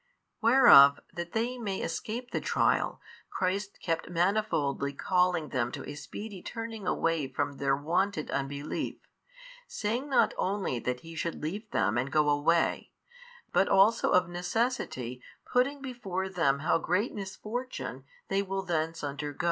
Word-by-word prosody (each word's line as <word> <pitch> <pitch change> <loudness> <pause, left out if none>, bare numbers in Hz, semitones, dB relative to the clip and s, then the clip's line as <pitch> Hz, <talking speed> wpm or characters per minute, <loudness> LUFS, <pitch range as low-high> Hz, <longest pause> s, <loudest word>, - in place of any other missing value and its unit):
Whereof 225 - +8
that 170 0 -6
they 240 +3 -1
may 200 -4 -3
escape 245 +3 -4
the - - -1
trial, - - +1 0.3
Christ 190 +2 -2
kept 165 -1 -2
manifoldly 170 -7 0
calling 180 -4 +1
them 120 -2 -1
to - - -6
a - - -5
speedy 190 +7 -8
turning 225 -3 -6
away 165 -5 +1
from 135 +1 -3
their 135 -1 +2
wonted 175 +3 -1
unbelief, 140 +2 -3 0.7
saying 235 +7 -2
not 270 - +3
only 190 -10 -1
that 125 +1 -3
He 165 0 -10
should 165 -1 -4
leave 205 +8 -4
them 110 +4 +1
and 130 +3 -2
go 150 0 +3
away, 160 +4 +1 0.6
but - - +3
also 200 +4 +4
of 180 -1 +4
necessity 175 - -2 0.3
putting 275 +3 +2
before 195 -8 -4
them 140 -7 +1
how 175 - +3
great 180 +8 0
misfortune 215 +5 -5 0.2
they 195 - +1
will 195 0 -3
thence 165 -3 -2
undergo. 145 0 -4
180 Hz, 140 wpm, -29 LUFS, 145-210 Hz, 0.7 s, Whereof